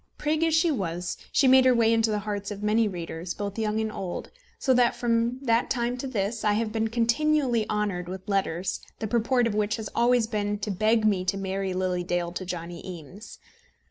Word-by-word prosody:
Prig 305 +2 0
as 325 -1 +3
she 325 +1 +3
was, 180 - -3 0.2
she 275 - +4
made 260 0 +7
her 255 -1 +5
way 230 -1 +4
into 225 0 +2
the 210 - 0
hearts 205 -1 -3
of 205 0 -6
many 215 +1 +3
readers, 170 -2 -5
both 205 +1 -4
young 215 0 0
and 220 -1 -1
old; 185 -4 -5 0.3
so 260 - +2
that, 245 -1 +3
from 235 +1 +1
that 230 -2 +2
time 240 -1 0
to 255 +2 -5
this, 220 -2 -2
I 210 -1 +3
have 215 +1 -1
been 225 0 0
continually 240 +1 +1
honoured 200 -4 -1
with 190 +2 -7
letters, 190 -3 -1 0.2
the 220 - -4
purport 240 +3 +2
of 230 - 0
which 210 0 0
has 220 -2 -5
always 240 -1 +3
been 210 -2 -2
to 205 0 -3
beg 215 +3 +2
me 200 -4 +2
to 195 +2 0
marry 195 0 -2
Lily 180 -1 -1
Dale 175 -1 -1
to 185 +2 -5
Johnny 175 -1 -6
Eames. 185 +4 -10
215 Hz, 210 wpm, -26 LUFS, 190-235 Hz, 0.3 s, made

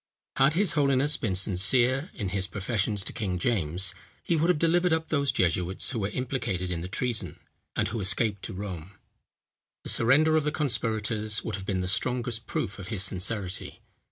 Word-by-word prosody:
Had 135 +3 +4
his 195 -2 +2
holiness 140 0 +2
been 100 -7 -2
sincere 120 - +3
in 100 -5 -3
his 95 0 -1
professions 105 0 -1
to - - -5
King 95 -4 -2
James, 90 -3 +1 0.3
he 170 - +1
would 165 +2 +2
have 180 - +4
delivered 170 +3 +2
up 160 0 0
those 140 -3 +2
jesuits 90 -3 0
who 120 - -2
were 100 -1 -1
implicated 105 -7 -3
in 85 -2 -3
the 90 - -5
treason, 110 -4 -2 0.4
and - - 0
who 110 +1 -3
escaped 100 +1 +3
to - - -6
Rome. 95 -2 -6 0.9
The - - -6
surrender 145 +7 +4
of 155 - +3
the 150 - 0
conspirators 110 -6 -1
would 110 - -4
have 95 0 -6
been 95 -2 0
the 90 - -2
strongest 115 +3 -1
proof 100 - -3
of 95 - -7
his 95 -2 +1
sincerity. 95 0 -2
110 Hz, 185 wpm, -27 LUFS, 95-135 Hz, 0.9 s, Had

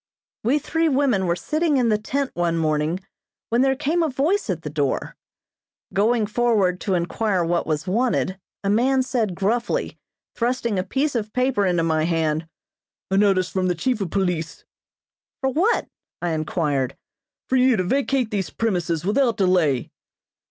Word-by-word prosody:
We 250 +7 +3
three 325 +2 0
women 260 -9 +2
were 170 - +2
sitting 305 - 0
in 245 -3 +2
the 215 - +3
tent 275 +5 -2
one 170 -1 0
morning 155 +2 0 0.5
when 235 +2 +2
there 265 0 +3
came 300 +5 0
a 325 - +1
voice 295 - 0
at 170 -3 -2
the 150 - -4
door. 145 -3 -1 0.8
Going 220 +3 +2
forward 210 -5 +1
to 190 - 0
enquire 180 +1 0
what 170 +1 0
was 155 +1 -1
wanted, 200 -2 0 0.2
a 200 - 0
man 260 +5 +3
said 225 -7 -1
gruffly, 225 +6 -1 0.3
thrusting 235 -4 -1
a - - 0
piece 270 +9 -1
of 215 -3 -2
paper 250 -6 +1
into 175 -2 +1
my 160 -1 +1
hand. 160 -1 0 0.6
"A - - +2
notice 190 -3 +3
from 185 -1 0
the 180 - +1
chief 245 +5 -1
of 190 - -2
police." 175 -4 -2 0.8
"For 265 -1 +1
what?" 375 - +1 0.3
I 175 -1 -1
inquired. 150 -4 -1 0.5
"For 260 - +1
you, 255 -2 +4
to 185 - +1
vacate 265 +2 0
these 195 -6 -1
premises 175 -5 -1
without 235 +3 +2
delay." 175 - +2
205 Hz, 165 wpm, -23 LUFS, 175-255 Hz, 0.8 s, you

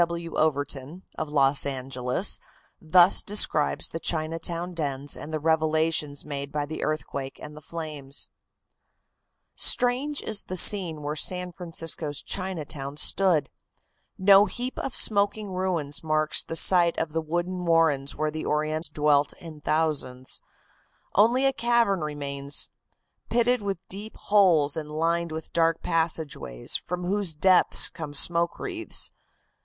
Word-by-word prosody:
W. 170 0 -2
W. - - -1
Overton, 145 +2 -3
of 155 - -4
Los 140 -1 +4
Angeles, 130 +4 0 0.4
thus 175 +3 +6
describes 200 -7 +2
the 165 - -5
Chinatown 165 +2 -2
dens 145 -3 -3
and 155 - -9
the 155 - -2
revelations 155 -2 0
made 140 -1 -5
by 150 0 -2
the 155 +2 -6
earthquake 140 -3 -4
and 150 0 -10
the 150 - -11
flames: 150 -4 -4 1.3
"Strange 260 +4 +3
is 215 -2 -2
the 185 - -4
scene 170 -5 +2
where 150 +1 -3
San 180 +3 0
Francisco's 165 -4 -3
Chinatown 150 -7 -4
stood. 180 -1 +2 0.7
No 195 +1 +6
heap 250 +1 -5
of 270 - -3
smoking 205 -1 +1
ruins 180 -6 -2
marks 155 -1 0
the 165 - -6
site 170 0 +5
of 165 -1 -2
the 160 - 0
wooden 175 +3 -3
warrens 160 -5 +2
where 155 0 -1
the 155 +1 -5
Orientals 155 +1 -1
dwelt 150 -1 +2
in 160 -4 -12
thousands. 145 -5 -2 0.7
Only 240 +6 +4
a 270 - +3
cavern 235 -6 +2
remains, 140 -2 -3 0.6
pitted 245 0 +2
with 200 -2 -3
deep 205 +3 -8
holes 175 -9 +3
and 155 -2 -5
lined 165 +2 -1
with 160 0 -7
dark 165 -1 +1
passageways, 160 - -2
from 180 0 -4
whose 190 -2 -1
depths 185 +4 +5
come 155 -4 -8
smoke 170 +3 +2
wreaths. 345 -4 -2
160 Hz, 135 wpm, -26 LUFS, 150-185 Hz, 1.3 s, thus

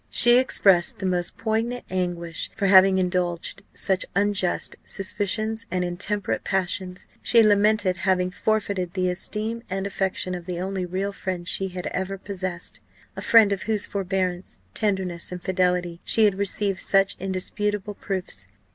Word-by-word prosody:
She 240 +1 +7
expressed 195 -8 +3
the 190 - -5
most 180 -1 -1
poignant 230 +2 -1
anguish 175 -3 -2
for 205 - -1
having 190 0 +7
indulged 180 -2 -1
such 190 -2 0
unjust 200 -2 0
suspicions 215 +3 -1
and 180 -1 -1
intemperate 200 +4 -1
passions. 185 -1 -2
She 230 -1 +5
lamented 205 -2 +3
having 185 -1 +1
forfeited 200 -3 -1
the 185 -1 +1
esteem 215 +5 -3
and 195 +1 -2
affection 190 -2 -1
of 175 -1 -6
the 175 -1 -3
only 190 0 -3
real 195 +3 -2
friend 185 -3 -4
she 195 - 0
had 180 -1 -6
ever 190 +1 -2
possessed 185 -3 -4 0.4
a - - -6
friend 220 -3 +6
of 195 - -4
whose 215 -2 +1
forbearance, 185 -2 -2 0.2
tenderness, 190 -5 -1
and 180 - -5
fidelity, 180 -2 0
she 220 - +4
had 205 - +4
received 200 0 0
such 195 0 +3
indisputable 205 +2 -2
proofs. 185 - -5
190 Hz, 145 wpm, -24 LUFS, 180-205 Hz, 0.4 s, She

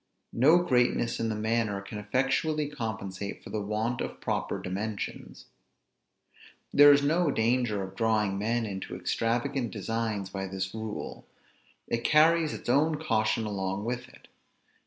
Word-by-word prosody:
No 150 +8 +6
greatness 125 -7 +1
in 115 - 0
the 110 - -1
manner 110 -1 0
can 100 +2 -7
effectually 140 +7 0
compensate 110 -8 -5
for - - -10
the 105 - -2
want 110 +4 -2
of - - -5
proper - - -2
dimensions. 100 +3 -5 1.3
There 145 0 +9
is 140 0 +5
no 165 +3 +2
danger 115 -4 +1
of 95 0 -8
drawing 105 -3 +1
men 115 +3 0
into 95 -3 -5
extravagant 120 +7 -1
designs 110 -2 -3
by 95 0 -4
this 95 0 -4
rule; 110 -1 -6 0.6
it 115 0 -2
carries 160 +2 +4
its - - -8
own 150 +6 +3
caution 110 -5 +1
along 95 0 -3
with 125 +1 -3
it. - - -18
115 Hz, 140 wpm, -28 LUFS, 105-125 Hz, 1.3 s, There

